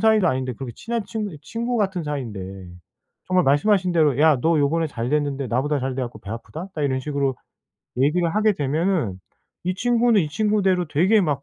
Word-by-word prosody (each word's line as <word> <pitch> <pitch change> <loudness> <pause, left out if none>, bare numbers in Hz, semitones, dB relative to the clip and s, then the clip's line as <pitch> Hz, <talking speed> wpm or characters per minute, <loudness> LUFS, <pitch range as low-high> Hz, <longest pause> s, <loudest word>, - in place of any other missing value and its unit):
사이도 220 -5 +4
아닌데 130 0 -1
그렇게 125 0 -7
친한 235 0 -3
친구니 205 -5 -5
친구 235 - -3
같은 190 -5 0
사이인데 95 -10 -5 0.6
정말 185 0 +3
말씀하신 180 +6 +3
대로 150 -5 +3
"야 155 -3 +5
너 165 +3 +2
요번에 160 +3 +2
잘 120 -4 -4
됐는데 145 -3 0
나보다 140 +4 0
잘 130 0 -2
돼 130 - -1
갖고 120 -3 -6
배 100 - -9
아프다." 155 +10 -7
딱 150 - -3
이런 130 -2 0
식으로 140 -1 -1 0.6
얘기를 165 +6 +2
하게 215 0 +3
되면은 150 - 0 0.5
이 185 +1 0
친구는 235 0 +3
이 150 - -3
친구대로 195 -1 +1
되게 185 +9 +3
막 145 -5 0
155 Hz, 400 characters per minute, -23 LUFS, 135-190 Hz, 0.6 s, 야